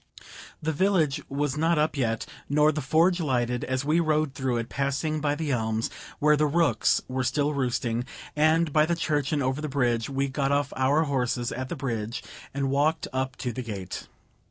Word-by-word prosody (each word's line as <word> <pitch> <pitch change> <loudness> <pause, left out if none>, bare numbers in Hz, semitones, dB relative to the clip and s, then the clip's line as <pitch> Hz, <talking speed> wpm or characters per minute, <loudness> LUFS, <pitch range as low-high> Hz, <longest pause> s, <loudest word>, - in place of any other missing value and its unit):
The 160 - +1
village 160 -4 +2
was 140 0 -1
not 165 +2 +2
up 155 +1 +1
yet, 115 -5 0 0.2
nor 150 +2 +4
the 155 0 -3
forge 165 +6 +3
lighted, 125 -5 0
as 130 +1 -2
we 155 +3 +3
rode 155 -3 +1
through 130 -3 -1
it, 115 -1 -2
passing 140 +4 -1
by 145 -1 +1
the 150 -1 -2
elms, 110 -2 -1 0.3
where 150 +1 +4
the 150 0 +2
rooks 145 -7 +2
were 130 0 -2
still 145 +3 +1
roosting, 125 -3 -1 0.3
and 155 +1 +3
by 155 0 +4
the 170 - +1
church, 150 -4 0
and 145 -3 +1
over 130 +3 -1
the 155 - -3
bridge. 120 -4 +1
We 135 0 0
got 135 0 -1
off 140 -1 +1
our 140 +4 +3
horses 125 -4 -1
at 130 +1 -4
the - - -3
bridge 115 -5 -3 0.3
and 135 -1 -1
walked 150 +3 +1
up 130 0 -1
to 125 - 0
the 130 - -4
gate. 100 -6 -6
140 Hz, 195 wpm, -27 LUFS, 130-155 Hz, 0.3 s, nor